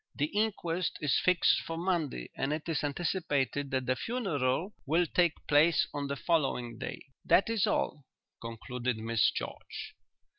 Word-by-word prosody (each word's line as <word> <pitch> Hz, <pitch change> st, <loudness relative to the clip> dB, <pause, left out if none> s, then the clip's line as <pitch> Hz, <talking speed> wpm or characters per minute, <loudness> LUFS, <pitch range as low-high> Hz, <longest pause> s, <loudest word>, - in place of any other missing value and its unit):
"'The 145 Hz, -, +1 dB
inquest 185 Hz, -5 st, 0 dB
is 145 Hz, -3 st, +2 dB
fixed 185 Hz, -1 st, +4 dB
for 165 Hz, -, -5 dB
Monday 165 Hz, -, -1 dB
and 135 Hz, -, -1 dB
it 155 Hz, +1 st, -3 dB
is 165 Hz, -3 st, -1 dB
anticipated 145 Hz, -3 st, -1 dB
that 130 Hz, -1 st, -1 dB
the 130 Hz, +1 st, +1 dB
funeral 175 Hz, -, -1 dB
will 165 Hz, +4 st, +3 dB
take 170 Hz, -1 st, +1 dB
place 150 Hz, +2 st, +4 dB
on 145 Hz, -1 st, -2 dB
the 140 Hz, -, -2 dB
following 135 Hz, -8 st, 0 dB
day.'" -, -, -6 dB, 0.2 s
"That 200 Hz, -, +4 dB
is 220 Hz, -4 st, +2 dB
all," 145 Hz, -, 0 dB, 0.4 s
concluded 120 Hz, +1 st, -3 dB
Miss 115 Hz, -1 st, +2 dB
George. -, -, -6 dB
150 Hz, 150 wpm, -31 LUFS, 130-175 Hz, 0.4 s, fixed